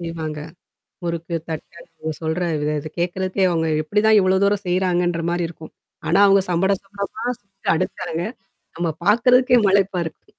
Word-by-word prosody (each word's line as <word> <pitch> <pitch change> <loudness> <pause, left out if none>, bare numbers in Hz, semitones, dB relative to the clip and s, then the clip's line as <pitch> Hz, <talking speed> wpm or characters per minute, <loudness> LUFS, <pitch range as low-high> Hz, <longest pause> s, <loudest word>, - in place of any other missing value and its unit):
செய்வாங்க. 160 -2 -5 0.7
முறுக்கு, 170 0 -3
தட்ட 160 -2 -6
அவுங்க 165 -1 -7
சொல்ற 160 +2 -1 0.4
இத 150 +2 -5
கேட்கிறதுக்கே 185 +2 -1
அவுங்க 165 -2 0 0.2
எப்பிடிதான் 210 +6 +3
இவ்ளோ 190 -1 +3
தூரம் 200 0 +2
செய்றாங்கன்ற 175 -2 +1
மாரி 175 0 0
இருக்கும். 160 -1 -12 0.3
ஆனா 175 - +3
அவுங்க 195 -1 +5
சம்பட 180 +3 +2
சம்படமா 200 +1 -6 0.2
செஞ்சு 195 -1 -17
அடுக்குறாங்க. 170 -1 -3 0.5
நம்ம 170 0 -1 0.2
பார்க்குறதுக்கே 250 +4 +5
மலைப்பா 195 -1 +2
இருக்கும். 160 - -8
180 Hz, 140 wpm, -21 LUFS, 165-195 Hz, 0.7 s, அவுங்க